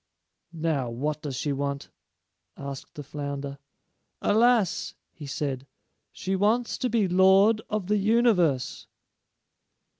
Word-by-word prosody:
"Now, 155 -6 -1
what 145 +6 -3
does 140 -3 -4
she 145 +3 -1
want?" 140 0 -3 0.7
asked 140 -1 -8
the 145 - -6
flounder. 140 -1 -5 0.6
"Alas," 225 -3 +2 0.2
he 150 -3 -10
said, 135 -1 -3 0.4
"she 190 +1 -3
wants 220 +5 +1
to 250 - 0
be 220 -4 +2
Lord 190 +4 +5
of 210 -3 -2
the 210 +3 +1
Universe." 200 - +2
160 Hz, 115 wpm, -26 LUFS, 140-210 Hz, 0.7 s, Lord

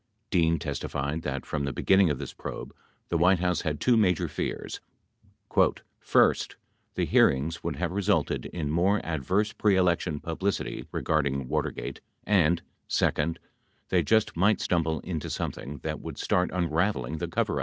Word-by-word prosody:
Dean 85 -4 +3
testified 70 +1 -3
that, 70 -4 -4
from 75 -2 -2
the 70 - -1
beginning 95 +7 +4
of 75 - 0
this - - -6
probe, - - -7 0.4
the 85 - +1
White 90 +2 +5
House 90 0 0
had 75 -4 -2
two 125 - +4
major 95 -6 +3
fears: - - -4 1.2
"First, - - +3 0.4
the - - +1
hearings 80 +6 +2
would 85 -3 -2
have 85 +4 -2
resulted 100 -5 0
in 75 -4 -3
more 95 +6 +3
adverse 90 +7 0
pre 105 -2 +3
election 85 -4 +1
publicity 95 +6 -3
regarding 70 -4 0
Watergate - - -3 0.2
and, 85 -5 +3 0.2
second, 80 +2 +1 0.5
they 90 - +3
just 110 +8 +2
might 100 +5 +3
stumble 80 -3 0
into 80 -5 -4
something 70 +4 -4
that - - -3
would - - -7
start 90 0 +1
unraveling 85 -4 0
the - - -2
coverup." - - 0
85 Hz, 150 wpm, -27 LUFS, 75-95 Hz, 1.2 s, White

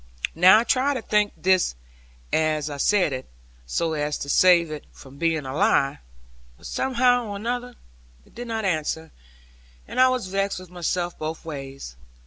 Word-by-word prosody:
Now 185 +5 +7
I 225 - +3
tried 270 +3 +1
to 245 - -4
think 210 -1 +2
this 185 - +2 0.6
as 155 -1 +1
I 145 - -5
said 180 0 +2
it, 130 0 -6 0.4
so 160 - -1
as 150 -1 -1
to 140 - -6
save 170 0 +5
it 150 -1 -6
from 135 +1 -15
being 165 -3 0
a 130 - -5
lie; 140 - +2 0.6
but - - -17
somehow 245 -2 +1
or 205 +2 -6
other 245 0 -3 0.5
it - - -23
did 245 +1 -7
not 225 -2 -2
answer, 160 -2 -2 0.8
and - - 0
I 255 - +7
was 255 -5 -1
vexed 195 +1 -1
with 185 -1 -11
myself 175 0 -2
both 155 +2 -5
ways. 135 - -8
180 Hz, 170 wpm, -24 LUFS, 155-215 Hz, 0.8 s, Now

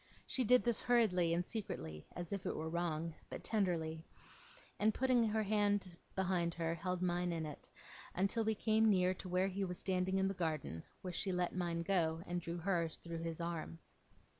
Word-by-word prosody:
She 260 - +1
did 250 +2 +5
this 235 -2 +3
hurriedly 210 -9 +3
and 175 +1 +1
secretly, 80 - -5
as 175 +1 -4
if 195 - -3
it - - -1
were 160 +1 -3
wrong, 165 -1 -1 0.2
but - - -6
tenderly; 165 -7 0 0.8
and, 215 +1 +3
putting 255 -2 +3
out - - -1
her 220 0 +1
hand 205 -3 +1 0.2
behind 180 -3 +1
her, 165 -1 0
held 180 +2 -2
mine 175 0 +1
in 165 -2 -2
it, 150 - -8 0.5
until 200 +5 +2
we 220 0 +1
came 220 +1 +3
near 185 -2 +4
to 185 0 -8
where 180 +2 +2
he 195 +1 -2
was 180 -2 -3
standing 190 0 0
in 190 0 +3
the 195 - 0
garden, 155 - -2 0.2
where 180 -1 -4
she 190 - +1
let 180 -1 0
mine 170 -2 -1
go, 165 -3 +1
and 175 0 -2
drew 170 +1 -4
hers 170 -2 0
through 170 -1 -6
his 165 0 -4
arm. 170 -1 -3
180 Hz, 195 wpm, -37 LUFS, 170-200 Hz, 0.8 s, did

